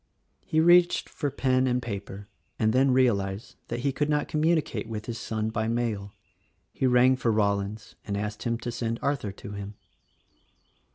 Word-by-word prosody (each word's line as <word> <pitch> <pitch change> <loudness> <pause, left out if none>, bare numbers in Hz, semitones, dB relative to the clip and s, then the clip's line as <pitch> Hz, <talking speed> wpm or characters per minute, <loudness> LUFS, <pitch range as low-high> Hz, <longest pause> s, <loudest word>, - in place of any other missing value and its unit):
He 160 - 0
reached 175 +2 +5
for 145 - -3
pen 130 -1 +1
and 125 0 +1
paper 100 -3 -6 0.3
and 110 -1 +2
then 135 +2 +4
realized 105 -6 +1
that 120 +1 -3
he 140 - +1
could 145 +2 -1
not 150 -1 +1
communicate 155 -8 0
with 105 -1 -5
his 115 -1 -5
son 110 0 -2
by 110 0 -1
mail. 115 -4 -2 0.6
He 130 - +1
rang 125 +1 +5
for 120 -3 0
Rollins 100 0 -1
and 100 -1 -3
asked 105 +1 -4
him 115 -1 -1
to 120 - -3
send 115 -1 -2
Arthur 140 -8 -1
to 100 - -10
him. 100 0 -7
115 Hz, 170 wpm, -27 LUFS, 105-130 Hz, 0.6 s, reached